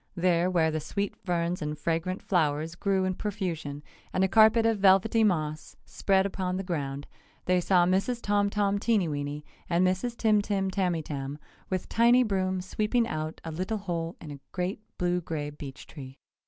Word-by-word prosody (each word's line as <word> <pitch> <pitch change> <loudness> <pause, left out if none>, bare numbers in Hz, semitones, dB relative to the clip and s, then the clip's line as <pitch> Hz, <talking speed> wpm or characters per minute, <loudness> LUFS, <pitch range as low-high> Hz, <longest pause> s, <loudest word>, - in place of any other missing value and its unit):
There, 175 0 +2
where 165 -3 +2
the 155 - -1
sweet 200 +6 -3
ferns 175 -1 -2
and 150 0 -3
fragrant 165 +5 -2
flowers 160 -3 0
grew 190 +2 0
in 185 - 0
profusion 175 -8 -4 0.3
and 185 - +1
a - - +4
carpet 220 +3 +5
of 225 -2 +2
velvety 195 +4 +4
moss 155 -6 -1
spread 195 -1 +1
upon 185 -2 -2
the 190 - -3
ground, 145 -6 -3 0.4
they 180 0 +3
saw 175 -1 +4
Mrs. 195 +7 +1
Tom 205 -2 +1
Tom 200 -1 +1
Teenyweeny 150 -10 0 0.3
and 175 +1 +3
Mrs. 190 +6 -1
Tim 215 -2 +3
Tim 195 -2 -1
Tamytam 155 -7 -2 0.3
with 185 -1 -2
tiny 240 +2 +5
brooms 185 -4 -1
sweeping 220 +4 0
out 155 -7 -4
a 165 - -5
little 185 +7 -2
hole 170 -4 -3
in 155 - -9
a 140 - -8
great 180 +2 -2 0.2
blue 180 0 0
gray 150 -3 -4
beech 145 -1 -9
tree. 135 -3 -10
185 Hz, 170 wpm, -28 LUFS, 160-200 Hz, 0.4 s, carpet